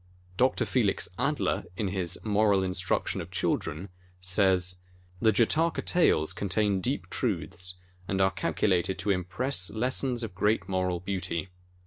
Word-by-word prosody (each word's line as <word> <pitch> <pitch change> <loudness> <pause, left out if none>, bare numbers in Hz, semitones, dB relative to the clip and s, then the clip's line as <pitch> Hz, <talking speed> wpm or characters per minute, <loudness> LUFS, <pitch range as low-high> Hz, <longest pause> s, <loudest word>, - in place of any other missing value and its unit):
Dr. 130 +6 +2
Felix 115 -6 +1
Adler - - 0
in 100 -2 -1
his 90 -3 -1
"Moral 105 -2 +3
Instruction 90 -1 0
of - - -8
ChiK - - 0
dren," 85 +7 -6 0.3
says: 90 -1 +3 0.4
The 110 - +5
Jataka 155 +10 +2
Tales 120 - +3
contain 100 0 0
deep - - -2
truths, 90 +2 -2 0.3
and 95 - -1
are 95 0 +4
cal 95 0 -2
culated 95 -2 +1
to 105 - 0
impress 90 +3 -1
lessons 125 +2 0
of 105 -5 -5
great 105 +4 +1
moral 90 -2 -1
beauty. 95 -2 -3
95 Hz, 140 wpm, -28 LUFS, 90-110 Hz, 0.4 s, The